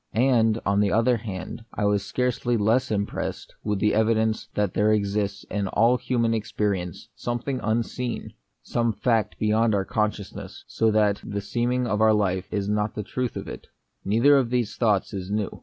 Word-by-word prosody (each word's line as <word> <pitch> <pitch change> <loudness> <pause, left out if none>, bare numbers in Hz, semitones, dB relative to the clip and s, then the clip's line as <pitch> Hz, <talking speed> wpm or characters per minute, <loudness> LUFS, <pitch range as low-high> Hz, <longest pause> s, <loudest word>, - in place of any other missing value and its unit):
And, 115 -2 +3
on 100 0 +2
the 100 -1 +2
other 115 +3 +3
hand, 100 -1 -6
I 105 - 0
was 100 -1 +2
scarcely 120 +1 0
less 115 +5 +2
impressed 100 -1 -3
with 105 -1 0
the 105 +2 +2
evidence 110 0 +1
that 105 -1 0
there 105 +1 +3
exists 100 -1 0
in 100 -1 -3
all 115 +5 +3
human 115 -2 0
experience 100 -5 -2
something 120 +2 -3
unseen, 120 +3 -2 0.3
some 115 -1 0
fact 115 -3 0
beyond 110 +1 +2
our 95 -1 0
con 105 +1 +1
sciousness, 105 -2 -9
so 115 - +1
that 105 -2 +2
the 100 - -4
seeming 120 +5 -1
of 105 -2 0
our 110 0 +6
life 95 -3 0
is 100 -1 -1
not 105 0 0
the 105 - -3
truth 125 +3 -3
of - - -5
it. - - -8 0.4
Neither 115 +8 +4
of 130 -4 +1
these 120 -4 -1
thoughts 105 -3 +1
is 95 -1 -5
new. 105 0 -2
110 Hz, 180 wpm, -25 LUFS, 100-115 Hz, 0.4 s, our